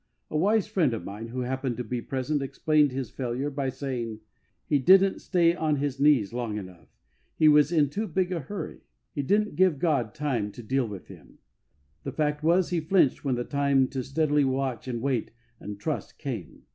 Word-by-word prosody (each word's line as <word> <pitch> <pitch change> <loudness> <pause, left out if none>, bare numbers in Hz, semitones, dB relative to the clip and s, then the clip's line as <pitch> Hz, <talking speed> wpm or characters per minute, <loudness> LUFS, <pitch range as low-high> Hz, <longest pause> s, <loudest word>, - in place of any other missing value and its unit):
A - - -4
wise 200 +6 +3
friend 175 - +1
of 105 - -6
mine, 105 +3 -6
who 125 +2 -4
happened 130 -1 -2
to 125 - -3
be 120 +1 -3
present, 135 +4 -2
explained 150 +1 +2
his 130 -3 -4
failure 130 +3 -3
by 135 -1 -2
saying: 120 -5 -4 0.2
" - - -45
He 145 - +3
didn't 190 +7 +5
stay 170 -3 +3
on 155 -3 +1
his 140 -1 -2
knees 140 -8 +4
long 120 -3 -3
enough. 90 -6 -9 0.5
He 155 - +4
was 150 0 +6
in 155 -4 +3
too 210 +10 -3
big 185 +1 0
a 175 - -1
hurry. 165 +4 -6 0.3
He 145 - -1
didn't 210 +9 +1
give 185 -5 +3
God 140 -6 0
time 130 -9 -1
to 120 - -10
don't 110 - -18
flinch. - - -4
93 - - +3
deal 135 -3 +2
with 100 -4 -8
him." - - -14 0.7
The - - -5
fact 150 -1 0
was, 170 +3 +3
he 175 - +1
flinched 160 -3 +2
when 135 -3 0
the 120 - -2
time 140 -1 +2
to 130 -2 -3
steadily 150 +2 +1
watch 130 -3 -1
and 120 -2 -3
wait 130 -5 0 0.3
and 105 0 -7
trust 155 +6 -4
came. 120 - -6
140 Hz, 210 wpm, -27 LUFS, 125-155 Hz, 0.7 s, was